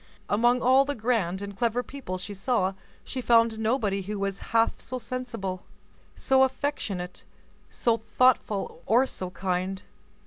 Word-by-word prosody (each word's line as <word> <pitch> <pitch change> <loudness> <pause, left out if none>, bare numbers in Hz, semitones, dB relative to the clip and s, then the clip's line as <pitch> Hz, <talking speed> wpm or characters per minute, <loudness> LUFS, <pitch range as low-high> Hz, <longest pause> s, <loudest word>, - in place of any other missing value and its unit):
Among 240 +4 +3
all 260 +2 +6
the 285 +1 -3
grand 210 -5 0
and 200 0 -7
clever 235 +4 0
people 255 -11 -6
she 200 +3 -6
saw, 195 -2 0 0.3
she 260 - -4
found 230 -2 +4
nobody 220 -3 +1
who 205 +2 -4
was 195 0 -2
half 225 0 +2
so 255 - -5
sensible, 230 -6 -5 0.5
so 265 0 +3
affectionate, 260 -9 -1 0.5
so 230 -1 +1
thoughtful, 225 -3 +1
or 240 +5 +5
so 185 -8 -5
kind. 185 +1 -2
225 Hz, 140 wpm, -27 LUFS, 195-250 Hz, 0.5 s, all